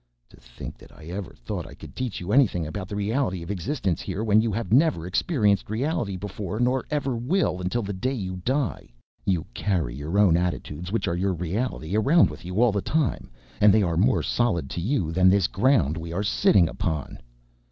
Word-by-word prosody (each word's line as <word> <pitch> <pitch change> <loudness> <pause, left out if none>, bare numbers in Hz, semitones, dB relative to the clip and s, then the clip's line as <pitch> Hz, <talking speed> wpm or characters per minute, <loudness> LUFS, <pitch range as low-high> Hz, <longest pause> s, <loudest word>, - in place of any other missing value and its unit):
"To - - -18
think - - -10
that - - -15
I 75 - -15
ever 95 +1 -5
thought - - -5
I - - -12
could - - -12
teach 125 -5 -3
you 90 +3 -5
anything 105 - +3
about 90 +5 -5
the 100 - -6
reality 100 -3 -1
of 85 - -5
existence 100 - -2
here 95 +2 -3
when 110 -1 +4
you 115 0 0
have 105 -1 -2
never 140 - +3
experienced 100 - +1
reality 110 - -1
before 105 +1 -5
nor 125 +1 +1
ever 140 -4 -1
will 120 - 0
until 100 +6 -1
the 100 0 -4
day 130 +8 -2
you 95 -5 -4
die. 130 - -2 0.4
You 90 -5 +1
carry 85 - -1
your 75 +8 -3
own 100 -5 +5
attitudes, 90 -1 -3
which 115 - -1
are 85 - 0
your 95 +2 0
reality, 90 +1 -3
around 140 - +4
with 75 0 -11
you 90 +3 -3
all 120 - +4
the 100 -1 -1
time, 155 +1 -1 0.3
and 105 0 +7
they 105 +1 +4
are 85 -3 0
more 110 +10 +3
solid 85 - 0
to 85 - -3
you 100 - 0
than 90 +2 +5
this 95 -1 +4
ground 95 - +2
we 85 0 -6
are 95 +4 -1
sitting 100 -3 +4
upon." 80 -2 -3
100 Hz, 205 wpm, -25 LUFS, 85-120 Hz, 0.4 s, and